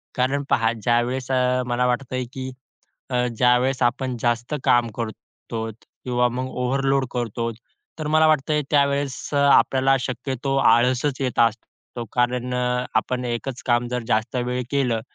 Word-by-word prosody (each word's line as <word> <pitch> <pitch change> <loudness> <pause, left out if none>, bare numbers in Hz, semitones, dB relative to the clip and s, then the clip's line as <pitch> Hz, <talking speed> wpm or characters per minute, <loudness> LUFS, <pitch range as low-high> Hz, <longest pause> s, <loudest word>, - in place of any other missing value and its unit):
कारण 135 +2 0
पहा, 115 0 +3
ज्यावेळेस 125 +2 0
अ, 125 0 +2
मला 125 +1 +1
वाटतंय 130 0 -2
की 130 0 -5 0.6
अ, 125 0 +1
ज्यावेळेस 125 +2 +3
आपण 125 +1 0
जास्त 120 +4 0
काम 120 -1 +4
करतो 115 0 -6 0.3
किंवा 125 -1 +2
मग 130 +2 -3
ओव्हरलोड 135 +1 0
करतो. 115 -1 -2 0.5
तर 155 - -4
मला 155 +1 +4
वाटतं 150 0 +2
त्यावेळेस 140 -2 +1
आपल्याला 135 -1 +4
शक्यतो 130 +2 -3
आळसचं 130 +3 +3
येत 125 - -3
असतो. 115 +1 -2
कारण 125 0 0
अ, 125 0 0
आपण 125 +3 0
एकचं 120 +1 -4
काम 120 0 +2
जर 125 -1 -2
जास्त 110 +3 0
वेळ 125 +1 -1
केलं 125 -5 +1
125 Hz, 140 wpm, -23 LUFS, 120-135 Hz, 0.6 s, काम